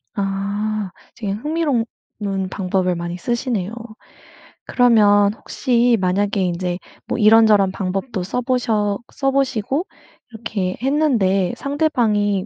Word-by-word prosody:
아 200 +1 -2 0.2
지금 200 -3 -3
흥미로우 295 -4 0 0.3
운 195 -2 -2
방법을 185 -1 -1
많이 175 +1 -4
쓰시네요. 230 -2 -2 0.9
그러면 210 -5 +4
혹시 240 +1 +1
만약에 200 +3 0
인제 180 0 -1 0.3
뭐 - - -2
이런저런 215 -3 +5
방법도 195 +2 -3
써 195 +7 -2
보셔 220 -5 0
써 270 -1 0
보시고 270 - 0 0.5
이렇게 210 -5 -3
했는데 235 - +1
상대방이 225 -10 0
210 Hz, 250 characters per minute, -20 LUFS, 195-245 Hz, 0.9 s, 이런저런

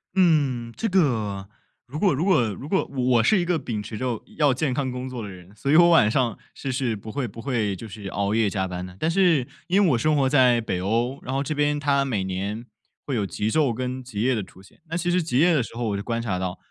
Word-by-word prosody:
嗯， 140 -10 +2
这 225 - -1
个， 110 - 0 0.4
如 145 +5 -7
果 195 -5 +3
如 150 +6 -1
果 185 -10 +4
如 140 - -8
果 190 +3 +1
我 125 -4 +2
是 210 - +4
一 175 - 0
个 175 -2 +1
秉 110 -6 -4
持 110 +1 -7
着 125 -2 -2 0.2
要 145 -4 +4
健 130 0 -1
康 130 -1 -1
工 125 +1 -5
作 125 -2 -6
的 105 - -6
人， 90 +1 -13
所 140 +6 -2
以 - - +5
我 170 +1 +7
晚 115 -11 +5
上 120 0 0 0.2
是 135 - -4
是 125 -3 -1
不 110 +1 -9
会 140 -3 -2
不 115 +2 -10
会 110 -6 -1
就 110 +5 -9
是 100 0 -8
熬 100 +1 -1
夜 110 -2 +2
加 95 -2 -2
班 90 0 -5
的。 90 - -11
但 160 - +1
是 170 -9 +3 0.2
因 195 +3 +3
为 175 - +4
我 120 - +3
生 155 +6 +2
活 140 -2 +3
在 125 -4 +4
北 90 -5 -2
欧， 120 +7 0
然 130 - -4
后 135 +1 0
这 155 - -2
边 145 0 +1
它 140 -1 +2
每 105 -8 -1
年 100 +5 -4 0.4
会 140 - -2
有 105 -4 0
极 105 +3 -2
昼 145 -5 +2
跟 130 +1 -4
极 110 -5 -5
夜 130 +3 +2
的 110 - -1
出 95 - -16
现。 95 - -20
那 165 - -2
其 175 0 0
实 180 - +2
极 155 -6 -1
夜 170 +3 +5
的 145 - +3
时 115 - -7
候 120 -1 -2
我 100 - -1
就 - - -4
观 115 -1 -2
察 100 -6 -2
到， 90 -1 -3
125 Hz, 290 characters per minute, -24 LUFS, 105-145 Hz, 0.4 s, 我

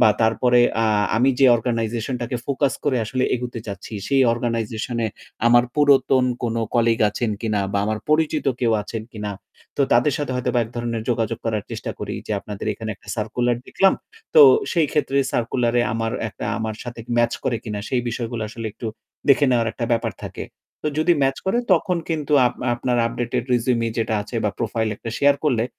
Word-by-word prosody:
বা 115 - +7
তারপরে 120 +2 +3 0.2
আ - - +2 0.3
আমি 130 +4 +4
যে 135 - +6
অর্গানাইজেশনটাকে 120 +1 -2
ফোকাস 140 0 +1
করে 135 -3 +2
আসলে 130 +4 -1
এগোতে 120 -1 -4
চাচ্ছি, 100 +1 -7
সে 140 - +1 0.2
অর্গানাইজেশন 115 0 -2
এ - - +2 0.4
আমার 120 +1 +6
পুরাতন 140 -3 +4 0.2
কোনো 115 -1 -1
কলিগ 115 -1 +3
আছেন 115 +1 -2
কিনা 105 -3 0
বা 100 - +1
আমার 110 +1 -1
পরিচিত 155 0 +1
কেউ 115 -2 +2
আছেন 110 +1 -5
কিনা। 105 -2 -4 0.5
তো 145 - +3
তাদের 120 +5 +4
সাথে 145 -3 -2
হয়তোবা 125 0 0
এক 110 - -6
ধরণের 120 -1 -2
যোগাযোগ 115 -1 -1
করার 110 -2 -1
চেষ্টা - - -4
করি - - -4
যে, - - -2
আপনাদের 105 0 -7
এখানে 110 +1 -6
একটা 100 - -22
সার্কুলার 120 +2 0
দেখলাম। 195 0 +3 0.4
তো 470 - +9 0.3
সেই 165 -4 +3
ক্ষেত্রে 140 -2 +1
সার্কুলারে 120 0 +1
আমার 115 0 -1 0.2
একটা - - -7
আমার 110 -1 -3
সাথে 120 -1 -7 0.2
ম্যাচ 120 0 +3
করে 125 -3 +1
কিনা 105 -3 -4
সেই 125 - +1
বিষয়গুলা 115 -1 -3
আসলে 115 +1 -6
একটু 115 - -7 0.4
দেখে 140 +1 +6
নেওয়ার 115 -2 +2
একটা 120 - -3
ব্যাপার 115 - 0
থাকে। - - -6 0.4
তো - - +2
যদি 160 +3 +4
ম্যাচ 135 0 +2
করে 195 +5 +2
তখন 180 +1 +2
কিন্তু 155 -3 -2
আপ 120 - -2 0.2
আপনার 120 +1 -1
আপডেটেড 120 +1 -2
রেজ্যুমে 120 -1 +1
যেটা 110 0 0
আছে 110 +3 -7
বা 105 - +2
প্রোফাইল 115 -1 -1
একটা 115 - -6
শেয়ার 140 0 +5
করলে 120 -7 +2
120 Hz, 185 wpm, -22 LUFS, 115-130 Hz, 0.5 s, তো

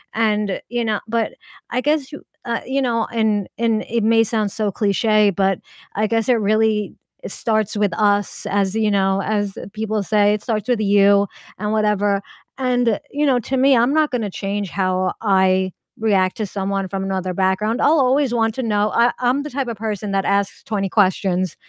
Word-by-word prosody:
And, 210 -3 0
you 240 0 -1
know 215 -2 0
but 225 -1 -1 0.4
I 250 - -1
guess, 295 0 0 0.3
uh 235 -1 -2
you 270 +1 -1
know, 235 -3 0
and 215 -3 +1
and 225 -1 +1
it 230 -1 0
may 225 +1 +4
sound 215 -2 -1
so 215 -1 -2
cliche, 210 +1 +2
but 195 0 0 0.4
I 215 +1 +1
guess 225 0 0
it - - +6
really 215 0 +1 0.3
starts 220 -3 -1
with 205 -2 +1
us 205 -2 +1
as 200 0 0
you 220 -1 +1
know, 195 -1 +1
as 205 -1 -2 0.2
people 215 0 -2
say, 205 0 +3
it 210 - -2
starts 215 -2 -2
with 245 -3 +2
you 200 -1 +4 0.3
and 210 +1 -2
whatever, 205 -2 +1 0.4
and, 245 -4 +1
you 295 +1 0
know, 265 -3 +3
to 265 +3 -3
me, 270 +1 +5
I'm 240 +4 +3
not 310 -1 +3
gonna 225 -6 -2
change 200 +1 -3
how 185 0 0
I 190 -2 +2 0.3
react 195 -4 +1
to 215 - -2
someone 195 0 -3
from 195 0 -3
another 185 -1 -2
background, 190 +5 0
I'll 310 +1 +4
always 265 0 +2
want 225 -2 +1
to 260 - -3
know 210 -2 +1
I 240 +1 +4
I'm 255 +3 +1
the 300 - -6
type 275 -1 -3
of 230 - -5
person 210 -1 -4
that 195 -1 0
asks 200 0 0
20 200 -3 -2
questions, 185 -3 +1
215 Hz, 190 wpm, -20 LUFS, 200-230 Hz, 0.4 s, it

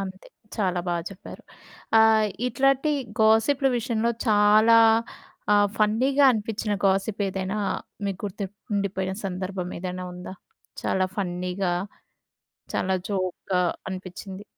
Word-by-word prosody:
అంతే 190 -1 -7 0.3
చాలా 185 -4 0
బాగా 170 -1 -1
చెప్పారు. 195 - -11 0.6
ఆహ్, 220 -1 +5 0.2
ఇట్లాంటి 275 +3 +2 0.3
గాసిప్లు 225 +6 +4
విషయంలో 235 -1 0 0.2
చాలా 215 +2 +6 0.7
ఆహ్, 205 0 +4
ఫన్నీ‌గా 255 +7 +3
అనిపించిన 215 -1 -2
గాసిప్ 195 +2 0
ఏదైనా 190 +2 -3 0.5
మీకు 195 -2 -4
గుర్తుండిపోయిన 200 -1 -3
సందర్భం 185 -1 -4
ఏదైనా 180 0 -5
ఉందా? 180 +1 -8 0.5
చాలా 185 0 +1
ఫన్నీ‌గా 180 -1 -2 1.0
చాలా 190 0 0 0.2
జోక్‌గా 185 -1 -1 0.3
అనిపించింది. 190 +1 -8
200 Hz, 100 wpm, -25 LUFS, 185-220 Hz, 1.0 s, చాలా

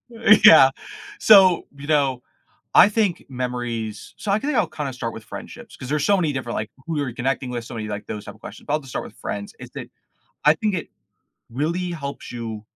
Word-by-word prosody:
Uh, 225 -1 +6
yeah, 135 -11 +10 0.5
so, 190 -5 +6
you 140 +1 -10
know, 140 -5 +1 0.5
I 205 - +8
think 205 -5 0
memories 120 -4 -4
so 200 - -3
I 205 - +2
think 290 +3 -2
I'll, - - +3
kinda, 145 -3 -5
start 115 -2 -5
with 110 - -9
friendships, - - -10
'cause 130 - -8
there's 145 +1 0
so 200 -1 +4
many 160 -5 0
different, 130 -3 -4
like, 110 0 -4 0.2
who 165 -2 -2
you're 140 -5 -2
connecting 130 +1 -2
with, 120 -1 -4
so 120 +1 -9
many 110 -1 -4
like 105 -1 -6
those 105 -1 -6
type - - -8
of - - -23
questions, - - -11
but 145 - -2
I'll 155 - +2
just 135 -3 -13
start - - -4
with - - -12
friends, 100 0 -6
is - - -10
that - - -6 0.6
I 150 - +7
think 210 +3 -1
it 170 - -5 0.6
really 170 +8 -2
helps 140 -5 -6
you 115 -3 -6
140 Hz, 220 wpm, -22 LUFS, 120-170 Hz, 0.6 s, yeah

